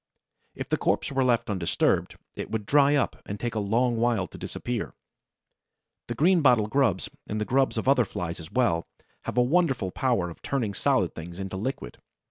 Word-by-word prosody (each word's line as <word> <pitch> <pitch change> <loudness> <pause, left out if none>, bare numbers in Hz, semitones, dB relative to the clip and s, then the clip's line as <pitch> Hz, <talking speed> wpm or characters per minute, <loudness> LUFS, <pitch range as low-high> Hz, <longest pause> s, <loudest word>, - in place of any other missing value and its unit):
If - - -5
the - - 0
corpse - - 0
were 135 -1 +1
left 120 -2 +2
undisturbed, 95 -6 0 0.2
it - - -5
would 110 -1 -3
dry 145 +3 +4
up 140 - 0
and 100 +1 -6
take 120 0 -2
a 110 - -1
long 115 +4 +1
while 120 0 +1
to - - -11
disappear. 120 -2 -4 1.1
The 120 - -3
Greenbottle 140 - +4
grubs, 125 -10 +2 0.2
and 105 - -3
the 105 - -1
grubs 135 +5 +1
of - - -2
other 130 -3 +5
Flies 90 -3 -5
as 80 -1 -10
well, 85 -10 +1 0.4
have - - -4
a 125 - +6
wonderful 135 - +1
power 115 -9 0
of - - -14
turning 120 -7 -1
solid - - +1
things 85 +2 -8
into 95 -1 -5
liquid. 105 - -4
120 Hz, 185 wpm, -27 LUFS, 100-130 Hz, 1.1 s, a